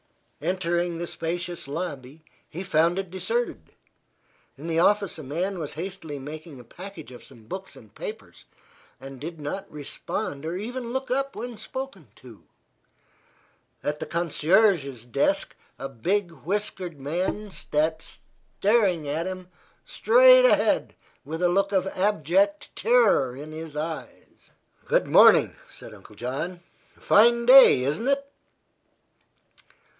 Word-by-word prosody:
Entering 175 0 -1
the 170 - -3
spacious 175 -1 -5
lobby, 150 -2 -6 0.3
he 175 +4 -6
found 170 0 +2
it 195 -3 -4
deserted. 470 - -3 0.8
In 145 - -10
the 165 -1 0
office 200 -1 +2
a - - -7
man 175 +8 -3
was 150 -4 -5
hastily 165 -3 -6
making 150 +1 -9
a - - -11
package 175 +4 -11
of 125 - -12
some 115 - -17
books 190 - -8
and - - -16
papers 455 -3 -9 0.5
and 135 -1 -10
did 165 +1 -7
not 150 +7 -5
respond 145 -1 -5
or 165 +3 -3
even 235 +3 -5
look 265 0 -3
up 275 +1 -1
when 240 0 -6
spoken 220 - -7
to. 120 -5 -15 1.4
At 150 0 -2
the - - -5
concierge's 170 - +2
desk 120 - 0 0.2
a 135 - -5
big, 175 - -1
whiskered 175 +1 -4
man 180 +8 -3
sat 160 -1 -1
staring 195 -6 -1 0.8
straight - - +6
ahead - - +4
of - - -26
him - - -28 0.3
with 160 +3 -5
a 175 - +4
look 195 +2 +1
of 190 -2 +2
abject 195 +1 0
terror 215 - +3
in 150 +2 -8
his 160 -1 -8
eyes. 160 +1 -7 0.3
"Good - - +2
morning," - - +6
said - - -12
Uncle - - -15
John. 140 +9 -4 0.4
"Fine 235 +3 +4
day, 255 - +8
isn't 150 - -1
it?" 280 0 +1
175 Hz, 130 wpm, -25 LUFS, 150-205 Hz, 1.4 s, day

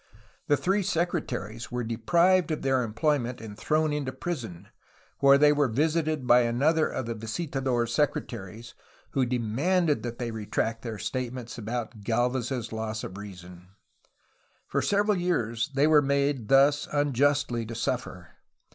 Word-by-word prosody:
The 145 - +3
three 195 +6 +1
secretaries 155 - -2
were 125 0 -2
deprived 170 +11 +2
of 155 - -3
their 135 -1 +2
employment 125 +2 -1
and 110 -2 -9
thrown 155 +7 0
into 145 -3 -2
prison, 130 - -6 0.5
where 140 0 +7
they 150 +1 +5
were 145 -1 +2
visited 155 +3 0
by 125 0 +6
another 140 +7 +2
of 130 - -4
the 115 - -3
visitador^ 130 +2 -2
s 120 0 -4
secretaries, 115 -5 -2 0.4
who 130 -2 +1
demanded 140 - +1
that 120 -1 -5
they 120 -2 -3
retract 110 +1 -2
their 115 -2 -5
statements 125 0 -4
about 115 0 -5
Galvez's 120 +1 -1
loss 110 -1 -4
of 95 - -7
reason. 90 -3 -10 1.0
For - - -1
several 205 -1 +2
years 120 -9 0
they 140 +1 +4
were 155 -1 +6
made 140 -4 0
thus 140 +3 +4
unjustly 145 -3 +1
to 115 - -6
suffer. 115 - -3
130 Hz, 145 wpm, -27 LUFS, 115-150 Hz, 1.0 s, where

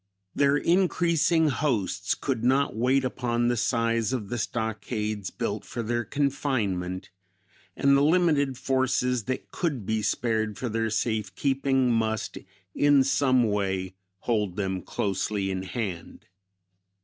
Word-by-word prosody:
Their 140 0 +3
increasing 170 -2 +2
hosts 125 -8 0
could 125 -5 -2
not 135 -1 +2
wait 130 +4 +2
upon 120 -1 0
the 120 - +1
size 115 -1 +1
of 110 -6 -3
the 120 - -2
stockades 110 -3 -3
built - - -3
for 120 - -5
their 120 +2 -1
confinement, 115 -11 -1 0.6
and 140 0 +4
the 140 - +4
limited 150 -4 +3
forces 125 -3 0
that 130 0 -4
could 145 - -2
be 110 +1 0
spared 110 0 -1
for 125 - -3
their 115 0 -1
safe 110 -1 -1
keeping 135 -2 +1
must 110 -2 -1 0.3
in 145 -2 +4
some 130 -2 +3
way 95 -3 -1 0.3
hold 105 -6 0
them 95 -2 -2
closely 100 +1 -2
in 95 -1 -2
hand. 95 -3 -5
120 Hz, 130 wpm, -26 LUFS, 105-135 Hz, 0.6 s, and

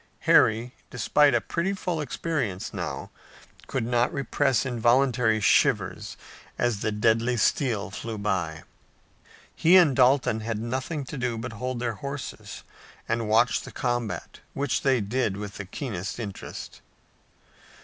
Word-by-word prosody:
Harry, 115 +3 +4 0.2
despite 135 +3 +3
a - - +4
pretty 170 +10 -2
full 180 -4 -2
experience 125 - -3
now, - - -5 0.6
could - - -2
not 120 +1 +1
repress 135 -3 +1
involuntary 120 -1 +2
shivers 95 -2 +2 0.4
as 120 -4 0
the 110 - -1
deadly 115 +3 +2
steel 110 -4 +1
flew 110 +2 -5
by. 90 -7 -2 0.9
He 175 +4 +6
and 160 -8 +5
Dalton 125 -3 +4
had 110 0 -3
nothing 130 +7 -3
to 135 +2 -6
do 125 -2 -1
but 115 +1 -5
hold 125 +3 -4
their 120 -1 -1
horses 140 0 -6 0.4
and 115 -1 -1
watch 115 +2 +3
the - - -10
combat, 120 -3 -3 0.2
which 140 +1 0
they 130 -4 +2
did 105 -1 -1
with 100 -1 -7
the 100 - -6
keenest 95 - -5
interest. 105 -4 -7
120 Hz, 135 wpm, -26 LUFS, 110-135 Hz, 0.9 s, He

